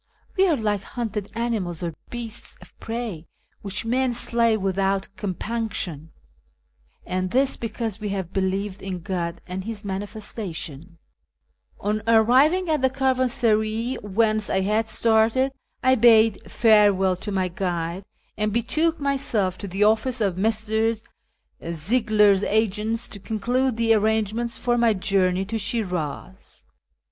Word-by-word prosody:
We 385 -1 +4
are 330 - +3
like 210 -3 0
hunted 215 -5 -4
animals 215 -8 -2
or 170 -1 -3 0.2
beasts 235 -2 -6
of - - -17
prey, 225 -8 -5 0.3
which 205 +2 -4
men 250 +1 +1
slay 230 -1 +2
without 195 0 0
compunction; 190 -5 -4 1.0
and 185 0 -2
this 265 +5 +2
because 225 -2 -4
we 210 -1 -3
have 190 -3 -4
believed 195 +1 -1
in 185 -2 -5
God 170 -1 -3
and 185 +1 -5
his 215 -1 -6
Manifestation," 190 - -5 0.8
On 210 +1 -1
arriving 260 +11 +4
at 310 -3 +1
the 260 - +3
caravansaray 245 -3 +1
whence 215 +1 +1
I 190 - +1
had 215 +3 +1
started, 225 +4 +3 0.3
I 260 0 +5
bade 225 -3 +4
farewell 205 -4 +4
to 205 - -5
my 190 -2 0
guide, 175 0 -3 0.3
and 210 0 -1
betook 310 +9 +1
myself 265 -10 0
to 200 - -5
the 195 +3 0
office 220 +4 +2
of 200 -5 +1
Messrs. 220 +2 0 0.6
Ziegler's 205 +4 +2
agents 220 +2 0
to 200 - -9
conclude 240 +4 -1
the 230 -1 +3
arrangements 220 +2 0
for 240 -1 +1
my 230 -2 +4
journey 185 -1 +1
to 225 +3 -3
Shiniz. 185 -5 -4
215 Hz, 130 wpm, -24 LUFS, 190-230 Hz, 1.0 s, I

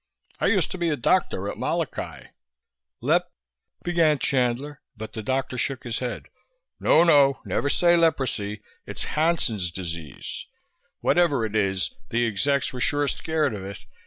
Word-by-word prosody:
"I - - +2
used - - +2
to 185 - -5
be 170 -1 +1
a 150 - +1
doctor 120 - +1
at - - -5
Molokai." - - -3 0.7
"Lep - - +2 0.3
" - - -39
began 165 -4 +3
Chandler, 130 +2 0 0.2
but 110 +1 -7
the 110 - -4
doctor 130 +2 -2
shook 135 -2 -2
his 120 -2 -3
head. 125 -2 -4 0.5
"No, 165 - +5
no, 145 -5 +5
never 140 - 0
say 175 +3 +4
'leprosy.' 125 -11 0 0.2
It's - - +1
'Hansen's 150 - +1
disease.' 85 -5 -6 0.5
Whatever 150 -9 +3
it 110 0 -5
is, 95 -3 0 0.2
the 120 +1 +1
execs 135 +6 0
were 125 - -5
sure 145 +2 +1
scared 155 -3 0
of 100 -3 -6
it. 100 +1 -6
130 Hz, 155 wpm, -25 LUFS, 105-150 Hz, 0.7 s, No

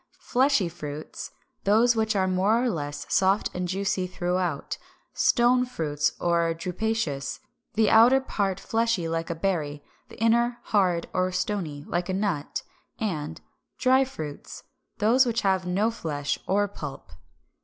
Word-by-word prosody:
Fleshy 260 -6 +2
Fruits, 155 -3 -7 0.3
those 225 +4 +4
which 220 -1 +1
are 190 -1 +2
more 200 +6 +2
or 250 - +1
less 145 -4 -4
soft 195 +2 +3
and 180 0 -2
juicy 190 0 -1
throughout; 180 -4 -2 0.3
Stone 250 +1 +3
Fruits, 150 -10 -1
or 170 -1 +1
Drupaceous, 175 -4 -2 0.4
the 220 -1 +3
outer 240 +4 +7
part 200 -7 -2
fleshy 225 -7 0
like 165 +1 -2
a 170 - -2
berry, 155 -5 -2 0.3
the - - -13
inner 235 +2 +3
hard 180 -5 +1
or 185 0 +1
stony, 170 -7 -3
like 175 +1 -2
a - - 0
nut; 190 -7 -2 0.4
and 155 - -3 0.4
Dry 260 +1 +4
Fruits, 155 - -7 0.3
those 245 +5 +4
which 235 0 0
have 190 -2 +1
no 200 +5 +1
flesh 145 -9 -3
or 205 +1 +2
pulp. 150 -8 -8
190 Hz, 140 wpm, -26 LUFS, 165-225 Hz, 0.4 s, outer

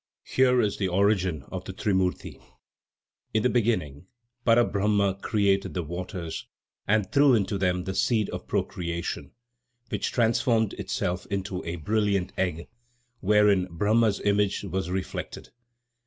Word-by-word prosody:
Here 125 -1 +3
is 105 - 0
the 95 - +1
origin 95 -5 +1
of - - -5
the - - -6
trimurti: 95 -3 -1 0.9
In 110 - +3
the 125 - +3
beginning, 90 - 0 0.4
Para 120 0 +5
Brahma 100 -1 +1
created 100 -3 +1
the 90 - -1
waters 85 0 -6 0.4
and 105 -1 +1
threw 140 -2 +5
into 100 -2 0
them 90 -1 +1
the 95 - -4
seed 110 +1 +1
of - - -6
procreation, 85 -1 -3 0.6
which 105 -2 -2
transformed 115 -2 +2
itself 90 -1 -3
into 95 -2 -3
a 85 +1 -3
brilliant 100 +2 0
egg, 85 -3 -2 0.5
wherein 105 -2 +3
Brahma's 105 +4 +2
image 100 -1 +1
was 95 -2 -3
reflected. 95 +1 -5
100 Hz, 130 wpm, -26 LUFS, 90-105 Hz, 0.9 s, Para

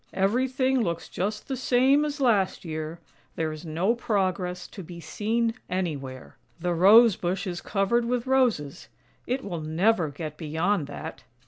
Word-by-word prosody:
" - - -33
Everything 260 +4 +1
looks 170 -5 -2
just 210 +3 -3
the 270 - -2
same 260 +3 +3
as 295 0 -3
last 210 -9 +2
year; 155 +1 -5 0.4
there 160 -1 -1
is 155 +2 -8
no 170 +8 +1
progress 185 -6 -1
to 200 - -9
be 175 0 -9
seen 225 +7 -1 0.2
anywhere. 140 -8 -4 0.2
The 175 +1 0
Rose 205 +5 +7
bush 185 +3 -2
is 175 -2 -4
covered 215 +4 +1
with 245 0 -1
roses 245 - +1 0.2
— - - -35
it 260 +2 -1
will 175 -5 -4
never 165 +3 +2
get 150 +1 -7
beyond 160 +2 0
that." 145 - -8
190 Hz, 160 wpm, -26 LUFS, 165-235 Hz, 0.4 s, Rose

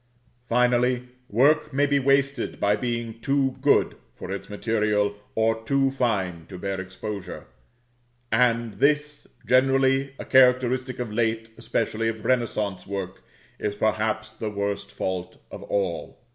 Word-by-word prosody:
Finally, 125 +1 +2 0.2
work 150 +7 +3
may 140 +1 +2
be 140 0 +2
wasted 135 +1 +1
by 100 +1 +3
being 115 0 -3
too 135 0 +1
good 145 +1 +3 0.2
for 90 - -7
its 100 - -5
material, 105 -1 0 0.2
or 115 0 +1
too 135 +2 +2
fine 100 -10 -1
to 90 - -9
bear 95 0 -3
exposure; 95 0 -7 0.9
and 115 -2 +2
this, 150 0 +1 0.2
generally 135 +1 +3
a - - -7
characteristic 130 0 +3
of 120 -4 -4
late, 115 0 -1
especially 115 -1 -1
of 110 -1 -4
renaissance, 105 -7 0
work, 95 -1 -5 0.4
is 105 -1 -2
perhaps 110 +1 -1
the 110 0 -4
worst 100 -1 -3
fault 90 -2 -4
of - - -8
all. 95 -4 -2
115 Hz, 130 wpm, -25 LUFS, 105-130 Hz, 0.9 s, work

